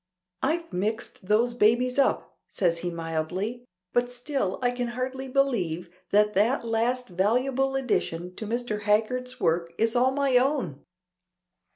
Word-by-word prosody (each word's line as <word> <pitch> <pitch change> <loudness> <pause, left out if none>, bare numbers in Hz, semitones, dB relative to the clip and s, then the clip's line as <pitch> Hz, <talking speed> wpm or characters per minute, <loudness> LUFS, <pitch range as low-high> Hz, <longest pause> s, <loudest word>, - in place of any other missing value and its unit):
"I've 330 - -1
'mixed 205 0 -3
those 230 +4 +3
babies 245 +3 +3
up,'" 275 - +1
says 170 -3 0
he 175 - -2
mildly. 175 +8 -3 0.3
"But 245 0 +2
still 245 -5 -2
I 245 - +3
can 245 0 -2
hardly 260 +1 -3
believe 200 -11 0 0.2
that 210 +1 +4
that 230 +6 +2
last 235 +2 0
valuable 250 +8 +1
addition 180 -9 -1
to 215 - -5
Mr. 230 -2 -2
Haggard's 225 +5 0
work 170 +1 +1
is 225 +1 +2
all 250 +2 +4
my 270 -1 +2
own." 250 - 0
235 Hz, 140 wpm, -27 LUFS, 190-255 Hz, 0.3 s, that